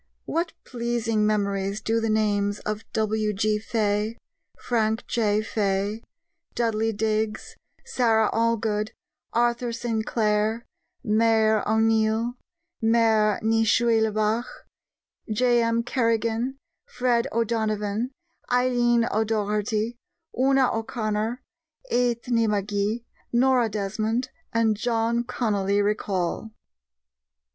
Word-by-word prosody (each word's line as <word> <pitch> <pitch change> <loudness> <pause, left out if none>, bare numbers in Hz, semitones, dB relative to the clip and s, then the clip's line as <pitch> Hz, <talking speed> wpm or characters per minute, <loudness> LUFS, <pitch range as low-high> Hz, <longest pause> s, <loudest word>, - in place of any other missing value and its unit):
What 335 +1 -1
pleasing 235 -3 -1
memories 200 -1 0
do 225 +1 0
the 225 0 -1
names 205 -1 +1
of 215 +1 -4
W.G. 215 -1 0
Fay, 215 0 -1 0.4
Frank 220 -1 0
J. 215 -2 +1
Fay, 205 0 -1 0.5
Dudley 225 -1 +1
Digges, 215 0 -2 0.3
Sara 225 -3 +2
Allgood, 225 -2 0 0.4
Arthur 240 0 +1
Sinclair, 220 -1 0 0.4
Maire 220 0 +3
O'Neill, 220 +2 +2 0.5
Maire 225 -2 +3
ni 225 0 +3
Shuiblaigh, 220 0 +2 0.9
J.M. 235 0 +2
Kerrigan, 230 +1 0 0.3
Fred 245 - +1
O'Donovan, 220 0 -1 0.4
Eileen 240 -2 +3
O'Doherty, 215 +1 0 0.4
Una 270 0 +3
O'Connor, 225 +1 -2 0.5
Eithne 240 -2 +1
Magee, 205 +3 -1 0.3
Nora 245 -1 +3
Desmond, 215 +5 -2 0.2
and 225 -2 +2
John 230 +1 0
Connolly 205 -5 0
recall! 205 -1 -1
220 Hz, 85 wpm, -25 LUFS, 210-235 Hz, 0.9 s, Maire